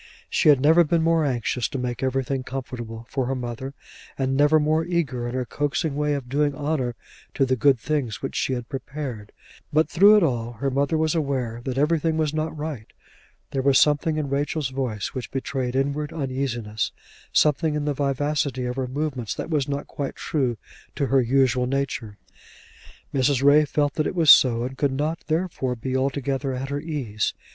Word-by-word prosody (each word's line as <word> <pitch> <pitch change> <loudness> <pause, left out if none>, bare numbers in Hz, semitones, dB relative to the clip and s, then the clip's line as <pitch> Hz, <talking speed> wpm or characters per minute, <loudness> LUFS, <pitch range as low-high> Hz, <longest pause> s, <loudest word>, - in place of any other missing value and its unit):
She - - +4
had 145 -3 +6
never 160 +5 +6
been 165 +1 +1
more 165 -1 +3
anxious 125 -2 -1
to - - -4
make 125 -1 -3
everything 135 0 -1
comfortable 120 -3 -6
for 135 -3 -2
her 135 - -1
mother, 125 +2 -5 0.4
and 135 0 0
never 145 +3 +5
more 155 +2 +2
eager 150 -9 -1
in 120 - -4
her 130 -1 -1
coaxing 145 +3 -1
way 150 0 +1
of 135 -3 -5
doing 145 +2 +1
honour 145 -5 -1 0.4
to 135 - +3
the 130 0 +1
good 135 +1 +4
things 130 -5 -2
which 135 - -5
she 130 - 0
had 120 -2 -4
prepared; 135 -6 -6 0.4
but, 155 +2 +3
through 205 +4 +6
it 205 - +4
all, 120 -5 -1
her 135 +4 -2
mother 140 +4 +1
was 155 0 +1
aware 130 -7 -2
that 130 -1 -3
everything 160 +2 +2
was 155 -2 0
not 155 0 -2
right; 145 -8 -5 0.6
there 135 - -1
was 135 0 +4
something 150 +1 +3
in 150 -2 -1
Rachel's 145 +1 -1
voice 130 -6 -3
which 130 -2 -5
betrayed 130 -1 -3
inward 140 +3 -1
uneasiness; 130 - -2 0.4
something 150 +1 +3
in 150 -1 -2
the 145 - 0
vivacity 140 -1 -1
of 125 +1 -3
her 130 -1 -1
movements 130 -4 -3
that - - -5
was 145 -4 +1
not 140 0 -2
quite 140 -2 -5
true 130 -7 -1 0.4
to 140 - 0
her 135 0 +3
usual 125 0 +2
nature. 125 -6 -3 1.0
Mrs. 135 0 +2
Ray 145 +2 +6
felt 145 0 0
that 155 - 0
it - - -4
was 160 -4 +7
so, 120 -2 +6
and 130 +1 -6
could 140 -3 +1
not 150 +4 -1
therefore 160 -6 -1
be 130 +3 -4
altogether 135 0 -1
at 130 +2 -4
her 140 0 -2
ease. 135 -10 -2
135 Hz, 190 wpm, -24 LUFS, 125-150 Hz, 1.0 s, was